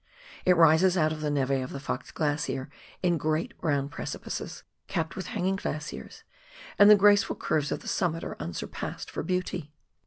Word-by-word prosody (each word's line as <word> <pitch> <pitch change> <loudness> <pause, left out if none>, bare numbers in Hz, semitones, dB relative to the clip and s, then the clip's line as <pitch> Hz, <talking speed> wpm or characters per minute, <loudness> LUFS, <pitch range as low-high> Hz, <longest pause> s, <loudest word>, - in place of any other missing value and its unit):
It 180 -1 +5
rises 170 +3 +5
out 155 -2 +3
of 155 - -7
the 150 - 0
neve 140 -2 0
of 130 -1 0
the 140 - -6
Fox 140 - -4
Glacier 145 -3 -2 0.3
in 175 -3 +2
great 155 +2 -1
brown 145 -4 +1
precipices, 145 - -6 0.2
capped 160 0 -2
with 190 - -5
hanging 195 -4 -1
glaciers, 155 -4 -6 0.6
and 205 0 +9
the 210 - +10
grace 205 0 +6
ful - - -4
curves 145 -2 -1
of - - -2
the - - -11
summit 165 -2 0
are - - -5
unsurpassed 85 0 -5
for - - -3
beauty. 180 -3 -2
160 Hz, 180 wpm, -28 LUFS, 145-180 Hz, 0.6 s, the